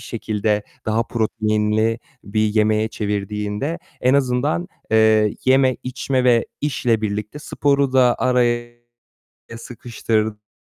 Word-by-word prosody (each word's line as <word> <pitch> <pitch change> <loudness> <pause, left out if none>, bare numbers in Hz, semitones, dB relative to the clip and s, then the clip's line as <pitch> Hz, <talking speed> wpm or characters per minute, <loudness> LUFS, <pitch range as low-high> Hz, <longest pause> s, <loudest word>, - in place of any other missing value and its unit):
şekilde 105 -3 -2 0.2
daha 110 +1 +1
proteinli 110 -1 0 0.3
bir 105 +2 -2
yemeğe 110 0 +2
çevirdiğinde 105 - -3 0.2
en 130 +2 +3
azından, 140 +6 0 0.2
eee, 110 -1 +4
yeme, 130 0 +4
içme 130 0 -1
ve 120 -2 +3
işle 125 -6 0
birlikte 105 +4 -4
sporu 140 -2 0
da 125 -2 +4
araya 120 -2 +1 0.9
sıkıştırdığında, 110 - -4
115 Hz, 100 wpm, -20 LUFS, 105-125 Hz, 0.9 s, eee